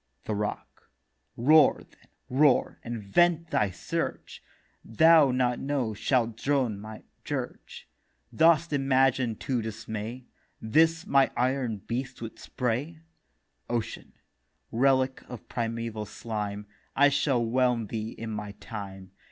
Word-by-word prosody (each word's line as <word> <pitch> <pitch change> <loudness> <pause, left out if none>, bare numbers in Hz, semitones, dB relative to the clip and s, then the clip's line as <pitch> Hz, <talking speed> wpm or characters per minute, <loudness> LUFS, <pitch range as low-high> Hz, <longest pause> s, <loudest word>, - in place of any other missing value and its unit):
THE 110 - -3
ROCK: 105 0 -5 0.5
'Roar, 150 +6 +5
then, - - -27 0.2
roar, 135 +1 +3
and 115 -2 -5
vent 170 - +2
thy 105 - +2
Surge; 90 - -4 0.4
Thou 160 +5 +5
not 125 -1 +1
now 135 -5 -1
shalt 115 +1 0
drone 130 -6 0
my 110 +1 -9 0.2
dirge. - - -6 0.5
Dost 165 0 +4
imagine 135 -3 +2
to 125 +2 -2
dismay 110 +2 -6 0.3
This 160 +8 +2
my 135 -1 +4
iron 125 -5 -1
breast 125 +2 -4
with 115 -1 -8
Spray?' 130 +7 -3 0.7
OCEAN: 120 -2 -4 0.6
'Relic 130 +2 +2
of 125 -3 -9
primeval 115 -2 -3
Slime, 105 -1 -5 0.3
I 145 +1 +6
shall 140 -4 +1
whelm 125 -1 +1
thee 110 +1 -4
in 115 -1 -7
my 105 -1 -5
time. 95 -3 -9
120 Hz, 120 wpm, -28 LUFS, 110-135 Hz, 0.7 s, I